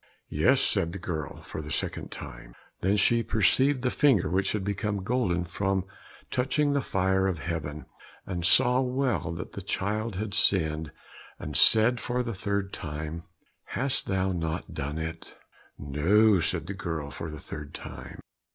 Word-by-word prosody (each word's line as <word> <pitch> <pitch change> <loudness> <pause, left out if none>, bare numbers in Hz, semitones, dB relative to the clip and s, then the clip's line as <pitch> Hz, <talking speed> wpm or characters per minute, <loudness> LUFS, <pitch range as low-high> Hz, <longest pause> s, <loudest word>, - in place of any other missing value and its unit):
"Yes," - - +4
said 85 0 +1
the - - -4
girl, 80 -5 -5
for - - -6
the 75 - -8
second - - -3
time. - - -9 0.2
Then 100 +3 +2
she 115 +4 +4
perceived 130 +5 +2
the 125 - +1
finger 115 - +3
which 95 +1 +1
had 105 -3 -1
become 100 0 -2
golden 95 -6 0
from 95 +2 -1 0.5
touching 140 +3 +1
the 140 - +2
fire 95 -2 +1
of 95 -3 -1
heaven, 75 -2 -4 0.4
and 90 -3 -4
saw 125 +9 +5
well 125 - 0
that 85 +1 -6
the 100 - -7
child 105 +3 -2
had 100 +1 -3
sinned, 80 -6 +2 0.5
and - - -7
said 115 +2 +6
for 125 +1 -1
the 115 -1 -3
third 100 0 -2
time 80 +2 -5 0.5
"Hast 130 0 0
thou 95 -1 0
not 85 +1 -3
done 75 -1 -4
it?" 80 +1 -6 0.4
"No," 95 +9 +3
said 85 -1 0
the 95 - -5
girl 80 -7 -4
for 80 - -6
the 75 0 -8
third 75 -1 -8
time. - - -9
95 Hz, 160 wpm, -28 LUFS, 80-110 Hz, 0.5 s, said